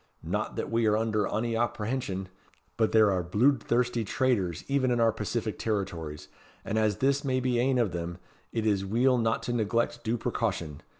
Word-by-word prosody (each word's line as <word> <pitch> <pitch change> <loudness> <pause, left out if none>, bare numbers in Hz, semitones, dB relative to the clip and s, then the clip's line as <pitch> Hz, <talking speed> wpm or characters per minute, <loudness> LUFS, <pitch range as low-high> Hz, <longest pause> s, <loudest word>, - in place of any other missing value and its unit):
Not - - -2
that - - -3
we 115 -1 +2
are 105 0 +3
under 110 -2 0
ony 115 +1 -1
apprehension; 110 -4 -2 0.5
but 110 -2 +1
there 110 -2 +5
are 90 -2 0
bluidthirsty 120 +3 +2
traitors 100 - 0
even 135 -2 +1
in 120 -1 +1
our 115 -1 +4
pacific 110 +1 -3
territories, 85 -9 -3 0.4
and 110 - 0
as 105 -3 +1
this 140 +1 +1
may 130 -2 +1
be 125 -1 +1
ane 130 +1 +2
of 115 -6 +2
them, 85 0 -4 0.3
it 110 -1 -2
is 100 -3 +2
weel 120 +6 +2
not 115 0 0
to 120 - -2
neglect 120 +1 0
due 115 +2 0
precaution. 100 - -2
115 Hz, 180 wpm, -28 LUFS, 100-120 Hz, 0.5 s, there